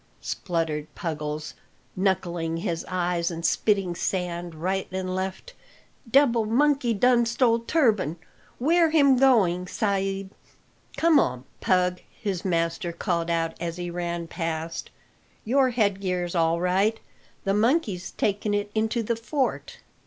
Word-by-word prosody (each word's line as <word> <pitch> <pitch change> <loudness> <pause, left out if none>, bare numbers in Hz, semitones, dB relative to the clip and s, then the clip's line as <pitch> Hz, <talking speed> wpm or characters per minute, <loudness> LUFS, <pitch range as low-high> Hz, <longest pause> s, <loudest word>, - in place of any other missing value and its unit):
spluttered 160 -4 -2
Puggles, 150 -2 -4 0.4
knuckling 175 -4 0
his 165 0 -2
eyes 175 -2 0
and 170 -1 -5
spitting 195 -4 +2
sand 175 -1 -3
right 185 +4 -2
and 185 0 -3
left, 190 - -4 0.6
"debil 245 -3 +4
monkey 275 +1 +2
done 240 +3 +4
stole 230 0 +2
turban. 225 - +1 0.4
Where 330 +5 +3
him 285 -4 +5
going, 195 -9 +3
sa'b?" 195 -1 -1 0.7
"Come 330 -3 +5
on, 125 0 0 0.2
Pug," 180 -1 +1 0.2
his 195 -5 -3
master 170 0 -1
called 170 -1 -2
out 165 -1 0
as 170 0 -3
he 175 -1 -4
ran 170 -1 -3
past; 165 -1 -4 0.6
"your 260 +3 +3
headgear's 190 -6 0
all 165 -1 +2
right 195 +5 +1 0.4
the 195 - +1
monkey's 210 - +1
taken 205 0 -1
it 205 0 -2
into 220 +2 0
the 235 +2 0
fort." 260 +4 -2
190 Hz, 125 wpm, -25 LUFS, 170-225 Hz, 0.7 s, him